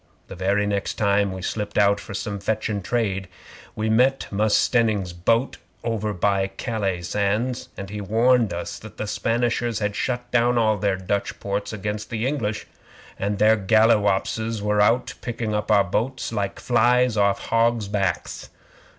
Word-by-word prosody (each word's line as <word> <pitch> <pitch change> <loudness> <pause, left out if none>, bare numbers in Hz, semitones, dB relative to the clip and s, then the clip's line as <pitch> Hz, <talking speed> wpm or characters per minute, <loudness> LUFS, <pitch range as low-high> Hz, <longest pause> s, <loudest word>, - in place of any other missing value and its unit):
The - - -7
very 100 +3 +1
next 100 -1 -2
time 100 -1 +2
we 95 -1 -6
slipped 105 +1 -3
out 100 0 +4
for 105 - -8
some 105 -2 -4
fetchin' 105 0 -2
trade, 100 -4 -1 0.5
we 110 +1 -2
met 125 +5 +3
Mus' 105 +1 +2
Stenning's 110 -7 +1
boat 115 +9 +1 0.3
over 110 -2 -1
by 100 0 +1
Calais 100 -7 -2
sands; 105 +7 -1
and 100 0 -7
he 105 0 -5
warned 115 +2 +3
us 85 0 -5
that 110 - -12
the - - -3
Spanishers 115 +2 0
had 105 -1 -2
shut 125 +2 -3
down 120 0 +3
all 110 -2 +3
their 100 -1 0
Dutch 100 +2 -2
ports 100 0 -3
against 105 +1 -4
us 115 - -2
English, 115 -4 -2 0.5
and 100 +1 -1
their 110 +2 +5
galliwopses 110 +1 +2
was 105 0 +1
out 120 +3 +2
picking 115 -2 -3
up 105 0 -2
our 105 -2 +5
boats 115 +6 -2
like 100 -3 -2
flies 125 0 +3
off 100 -1 +3
hogs' 115 -2 +2
backs. 100 -3 -2
105 Hz, 160 wpm, -23 LUFS, 100-115 Hz, 0.5 s, their